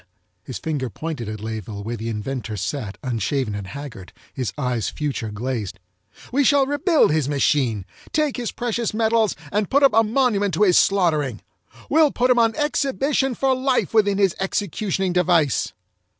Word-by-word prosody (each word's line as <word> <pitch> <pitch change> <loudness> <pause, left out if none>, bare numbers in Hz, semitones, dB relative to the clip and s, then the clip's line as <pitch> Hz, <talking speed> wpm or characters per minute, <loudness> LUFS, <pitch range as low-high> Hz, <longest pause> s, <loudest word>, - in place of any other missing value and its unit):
His - - -6
finger 145 -6 -3
pointed 145 -4 -5
at 110 -1 -6
Layeville 110 -2 -5
where 115 +3 -4
the 115 +1 -5
inventor 115 0 -4
sat 105 +1 -4
unshaven 125 -1 -1
and 100 -1 -5
haggard, 140 -8 -9 0.2
his 125 -7 -3
eyes 120 -6 -1
failure 140 -7 -3
glazed. 110 -2 -4 0.5
"We 280 +3 +2
shall 275 +1 +4
rebuild 290 - +3
his 150 -3 +1
machine, 130 -8 +1 0.3
take 305 -3 +1
his 240 -2 -3
precious 235 -2 -2
metals, 225 -1 +2 0.2
and 205 0 0
put 280 +1 +3
up 275 - +6
a 225 - +6
monument 210 - +1
to 210 - +3
his 180 -4 +5
slaughtering! 155 - +1 0.5
We'll 310 0 +4
put 250 -1 +1
him 245 - +4
on 225 -1 +3
exhibition 275 -2 0
for 270 +2 +2
life 260 -2 0
within 205 -3 +3
his 195 -4 +3
executioning 195 -1 -1
device!" 170 -7 +2
175 Hz, 165 wpm, -22 LUFS, -, 0.5 s, up